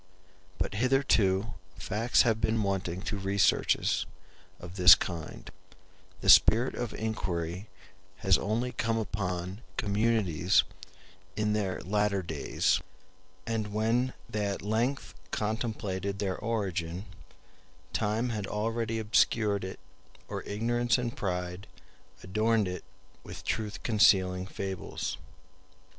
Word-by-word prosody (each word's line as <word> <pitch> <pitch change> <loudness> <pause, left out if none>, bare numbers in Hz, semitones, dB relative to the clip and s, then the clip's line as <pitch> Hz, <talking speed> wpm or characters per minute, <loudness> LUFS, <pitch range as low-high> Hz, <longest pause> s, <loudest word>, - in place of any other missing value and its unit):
But - - -2
hitherto 115 -4 +2 0.2
facts 110 +5 +2
have 110 -2 +1
been 110 0 +1
wanting 95 -2 -2
to 105 - -3
researches 95 +1 +2 0.5
of 90 +1 -10
this 90 -1 +9
kind: 85 -3 -6 0.7
the - - -4
spirit 115 +6 +7
of 120 -2 -4
inquiry 95 -4 -3 0.6
has 95 -1 +6
only 115 +4 -1
come 115 -2 -1
upon 95 -2 -3 0.2
communities 105 - +2 0.7
in 105 0 0
their 100 -3 -1
latter 100 0 0
days; 80 -4 0 0.6
and 110 -2 -2
when 115 +4 +1
they 105 -1 -2
at 100 -1 -4
length 115 +6 -1 0.2
contemplated 105 -3 -2
their 95 -2 -1
origin, 95 -5 -3 0.9
time 110 +3 0
had 105 -4 -3
already 115 +2 -2
obscured 105 -2 +2
it, 95 - -6 0.5
or - - -4
ignorance 120 +4 +1
and 120 -1 -3
pride 90 0 -3 0.6
adorned 110 +2 +1
it 90 -1 -5 0.4
with - - -9
truth 110 -2 -3
concealing 95 -5 +3
fables. 95 -2 -4
105 Hz, 110 wpm, -29 LUFS, 95-115 Hz, 0.9 s, this